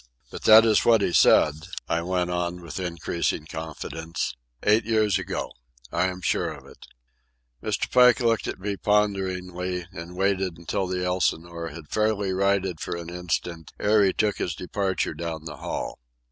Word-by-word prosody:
But -, -, -8 dB
that 110 Hz, +1 st, +9 dB
is 110 Hz, -2 st, +4 dB
what 115 Hz, -3 st, +5 dB
he 90 Hz, -, 0 dB
said," 75 Hz, -, +6 dB, 0.3 s
I 85 Hz, 0 st, 0 dB
went 90 Hz, 0 st, -1 dB
on 90 Hz, 0 st, -2 dB
with 85 Hz, +1 st, -7 dB
increasing 85 Hz, -2 st, -2 dB
confidence. 80 Hz, 0 st, -5 dB, 0.3 s
"Eight 105 Hz, +2 st, +4 dB
years 110 Hz, -3 st, +2 dB
ago. -, -, -4 dB, 0.4 s
I 90 Hz, +2 st, +2 dB
am 90 Hz, 0 st, -5 dB
sure -, -, 0 dB
of -, -, -11 dB
it." -, -, -15 dB, 0.7 s
Mr. -, -, -1 dB
Pike 125 Hz, +1 st, +6 dB
looked 115 Hz, -2 st, +1 dB
at -, -, -4 dB
me 100 Hz, +1 st, -3 dB
ponderingly, 95 Hz, -4 st, 0 dB
and 85 Hz, +2 st, -8 dB
waited 95 Hz, -3 st, 0 dB
until 95 Hz, +3 st, -2 dB
the 90 Hz, 0 st, -2 dB
Elsinore 85 Hz, -2 st, -1 dB
had 80 Hz, -1 st, -10 dB
fairly 105 Hz, -3 st, +1 dB
righted 95 Hz, -2 st, +1 dB
for -, -, -3 dB
an 85 Hz, 0 st, -7 dB
instant 85 Hz, -2 st, -3 dB
ere 105 Hz, 0 st, +4 dB
he 95 Hz, -, +4 dB
took 105 Hz, +1 st, 0 dB
his 85 Hz, -, -2 dB
departure 95 Hz, +2 st, -2 dB
down 80 Hz, -2 st, -5 dB
the 75 Hz, -2 st, -7 dB
hall. -, -, -4 dB
90 Hz, 165 wpm, -25 LUFS, 85-100 Hz, 0.7 s, that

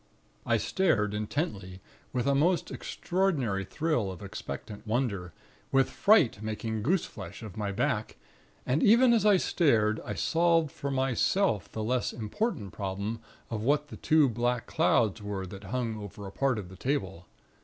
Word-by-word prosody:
I -, -, +3 dB
stared, 110 Hz, -, +1 dB
intently, 105 Hz, -, -3 dB, 0.3 s
with 125 Hz, -1 st, -1 dB
a 140 Hz, -, +3 dB
most 165 Hz, +6 st, +2 dB
extraordinary 150 Hz, -, -1 dB
thrill 120 Hz, -, -1 dB
of 95 Hz, +2 st, -9 dB
expectant 105 Hz, +1 st, -7 dB
wonder, 105 Hz, -7 st, -1 dB, 0.4 s
with 135 Hz, 0 st, +3 dB
fright 170 Hz, -, +4 dB
making 110 Hz, 0 st, -3 dB
goose 170 Hz, -, +1 dB
flesh -, -, -9 dB
of 105 Hz, -3 st, -8 dB
my 105 Hz, -2 st, -2 dB
back. 105 Hz, 0 st, -1 dB, 0.5 s
And 140 Hz, +5 st, +1 dB
even 235 Hz, +3 st, +6 dB
as 220 Hz, -2 st, +3 dB
I 205 Hz, -2 st, +6 dB
stared, 110 Hz, -13 st, +2 dB
I -, -, -4 dB
solved 165 Hz, -2 st, +2 dB
for 140 Hz, -, -5 dB
myself 135 Hz, -, +1 dB
the 110 Hz, -, -4 dB
less 125 Hz, +3 st, 0 dB
important 110 Hz, -, -3 dB
problem 100 Hz, +3 st, -3 dB, 0.3 s
of 110 Hz, -2 st, -2 dB
what 150 Hz, +5 st, +1 dB
the -, -, -8 dB
two 155 Hz, -2 st, +4 dB
black 120 Hz, 0 st, -1 dB
clouds 110 Hz, -2 st, +2 dB
were 100 Hz, -2 st, -4 dB
that 95 Hz, +2 st, -10 dB
hung 115 Hz, +1 st, -2 dB
over 100 Hz, 0 st, -8 dB
a 95 Hz, -, -7 dB
part 135 Hz, +3 st, +1 dB
of 95 Hz, -4 st, -6 dB
the 95 Hz, -, -12 dB
table. 95 Hz, -, -2 dB
115 Hz, 160 wpm, -29 LUFS, 105-150 Hz, 0.5 s, even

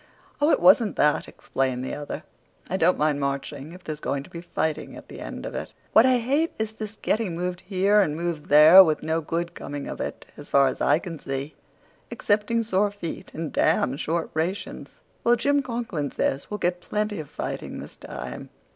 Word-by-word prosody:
"Oh, 295 Hz, -, +4 dB
it -, -, +4 dB
wasn't 240 Hz, -7 st, +5 dB
that," 150 Hz, 0 st, +2 dB
explained 130 Hz, -1 st, -2 dB
the -, -, -4 dB
other. 145 Hz, 0 st, -6 dB, 0.5 s
"I -, -, +1 dB
don't 180 Hz, 0 st, +3 dB
mind 150 Hz, -1 st, +1 dB
marching, 140 Hz, +1 st, -3 dB
if 180 Hz, 0 st, -13 dB
there's 155 Hz, -1 st, -5 dB
going 140 Hz, -2 st, -2 dB
to -, -, -16 dB
be 170 Hz, -, -7 dB
fighting 160 Hz, -2 st, -3 dB
at -, -, -12 dB
the -, -, -9 dB
end -, -, -7 dB
of -, -, -5 dB
it. -, -, -6 dB, 0.2 s
What 225 Hz, +4 st, +7 dB
I 255 Hz, -1 st, +4 dB
hate 280 Hz, +8 st, 0 dB
is 220 Hz, 0 st, -2 dB
this 220 Hz, -1 st, -7 dB
getting 215 Hz, -6 st, 0 dB
moved 180 Hz, +1 st, -3 dB
here 200 Hz, +2 st, +3 dB
and 150 Hz, -6 st, 0 dB
moved 165 Hz, -2 st, -3 dB
there, 155 Hz, +6 st, +10 dB
with 155 Hz, -4 st, 0 dB
no 160 Hz, +1 st, 0 dB
good 170 Hz, +2 st, -3 dB
coming 145 Hz, 0 st, -6 dB
of -, -, -5 dB
it, -, -, -5 dB
as -, -, -11 dB
far 140 Hz, 0 st, +5 dB
as 130 Hz, -, -1 dB
I 145 Hz, -, +4 dB
can 165 Hz, -2 st, -7 dB
see, 135 Hz, +3 st, -4 dB, 0.6 s
excepting 215 Hz, +2 st, +1 dB
sore 205 Hz, -1 st, +1 dB
feet 200 Hz, -5 st, -7 dB
and 160 Hz, -1 st, -4 dB
damned 135 Hz, +3 st, +2 dB
short 165 Hz, +1 st, -2 dB
rations." 170 Hz, +5 st, -4 dB, 0.2 s
"Well, 240 Hz, +1 st, +5 dB
Jim 285 Hz, +4 st, +2 dB
Conklin 230 Hz, -, -3 dB
says 135 Hz, -, -1 dB
we'll 210 Hz, -, -3 dB
get 180 Hz, -2 st, -1 dB
plenty 210 Hz, +1 st, -2 dB
of 150 Hz, -, -7 dB
fighting -, -, -5 dB
this -, -, -9 dB
time." 65 Hz, 0 st, -8 dB
170 Hz, 200 wpm, -25 LUFS, 150-210 Hz, 0.6 s, there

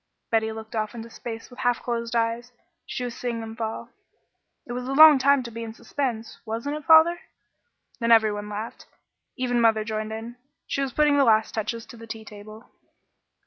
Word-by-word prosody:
'" -, -, -54 dB
Betty 220 Hz, -1 st, +2 dB
looked 220 Hz, +1 st, -8 dB
off 215 Hz, +1 st, -2 dB
into 230 Hz, 0 st, -8 dB
space 225 Hz, +1 st, -8 dB
with 245 Hz, -, -13 dB
half 245 Hz, -2 st, 0 dB
closed 235 Hz, -1 st, -3 dB
eyes. 230 Hz, +1 st, -1 dB, 0.4 s
She 250 Hz, -, -4 dB
was 245 Hz, -1 st, -4 dB
seeing 240 Hz, -2 st, -3 dB
them 225 Hz, 0 st, -7 dB
fall. 225 Hz, -1 st, -5 dB, 0.8 s
"It -, -, -9 dB
was 250 Hz, +1 st, -4 dB
a 270 Hz, -, -2 dB
long 305 Hz, -1 st, +9 dB
time 280 Hz, 0 st, +4 dB
to 235 Hz, -, -8 dB
be 230 Hz, +1 st, -6 dB
in 225 Hz, -1 st, -7 dB
suspense, 235 Hz, -6 st, -4 dB
wasn't 230 Hz, +7 st, -3 dB
it, 305 Hz, -, -11 dB
father?" 325 Hz, +2 st, +6 dB, 0.8 s
Then 230 Hz, -1 st, +1 dB
every 220 Hz, -2 st, +6 dB
one 205 Hz, 0 st, -5 dB
laughed. 210 Hz, +2 st, -7 dB, 0.5 s
Even 245 Hz, -2 st, 0 dB
mother 220 Hz, -1 st, +3 dB
joined 215 Hz, 0 st, -4 dB
in. 225 Hz, +2 st, -7 dB, 0.3 s
She 275 Hz, -, -2 dB
was 270 Hz, -1 st, -1 dB
putting 295 Hz, +2 st, +3 dB
the -, -, +6 dB
last 220 Hz, -3 st, +3 dB
touches 225 Hz, +1 st, -3 dB
to 235 Hz, -, -13 dB
the 230 Hz, 0 st, -11 dB
tea 220 Hz, 0 st, -7 dB
table. 215 Hz, +2 st, -12 dB
230 Hz, 200 wpm, -25 LUFS, 220-250 Hz, 0.8 s, long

